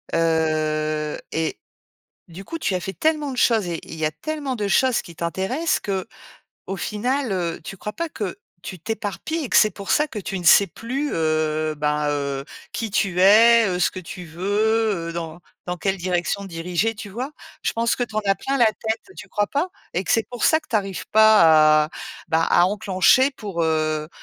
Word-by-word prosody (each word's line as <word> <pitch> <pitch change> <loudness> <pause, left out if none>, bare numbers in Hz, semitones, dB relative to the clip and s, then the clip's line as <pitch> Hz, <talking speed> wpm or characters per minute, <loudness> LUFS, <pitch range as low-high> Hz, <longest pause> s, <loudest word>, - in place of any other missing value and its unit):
heu 155 -2 0
et 160 0 -2 0.7
du 180 +4 -10
coup, 330 - -6
tu 200 - -1
as 180 - -1
fait 190 +2 -5
tellement 300 - 0
de 255 - -7
choses 225 -5 +3
et 170 - -3
il - - -9
y 160 -1 -3
a 155 - +2
tellement 280 - -4
de 205 -2 -2
choses 255 +4 +3
qui 170 - -12
t'intéressent 190 - -1
que, 195 -1 -3 0.6
au 195 - -4
final, 245 +5 -2
heu, 170 -3 -2
tu 195 - -7
crois 210 - -5
pas 335 0 -3
que 200 - -5 0.2
tu 185 +1 -7
t'éparpilles 225 - -4
et 250 - -5
que - - +3
c'est 215 - +6
pour 200 -1 -8
ça 300 - +3
que 220 - -6
tu 195 0 -4
ne 175 - -8
sais 200 +4 +7
plus, 260 - -4
heu, 155 -1 0
ben 150 0 0
heu, 140 -1 -2 0.3
qui 225 -2 -3
tu 190 -3 0
es, 225 +4 +7
heu, 180 - -1
ce 180 - +2
que 185 - -8
tu 180 +1 -9
veux 205 +2 0
eux, - - -4
dans 165 0 -6 0.3
dans 180 - -3
quelle 195 +2 0
direction 180 +2 -1
diriger, 180 +4 -2
tu 205 -1 -8
vois? 250 +9 -5 0.3
Je - - 0
pense 230 +1 0
que 245 - -2
tu 220 - -15
en 215 - +1
as 195 - +4
plein 270 +8 -2
la 235 - +6
tête, 220 +1 -2
tu - - -10
crois 205 0 0
pas? 290 - -1 0.3
Et 180 +3 -1
que - - 0
c'est 225 - +2
pour 245 -2 -3
ça 315 - +4
que - - -25
tu 225 - +1
arrives 195 -2 -3
pas 160 -8 +6
à, - - -17 0.4
bah, 160 0 +2
à 175 - +5
enclencher 205 +6 +3
pour, 200 -10 -4
heu 155 -1 0
195 Hz, 210 wpm, -22 LUFS, 165-225 Hz, 0.7 s, sais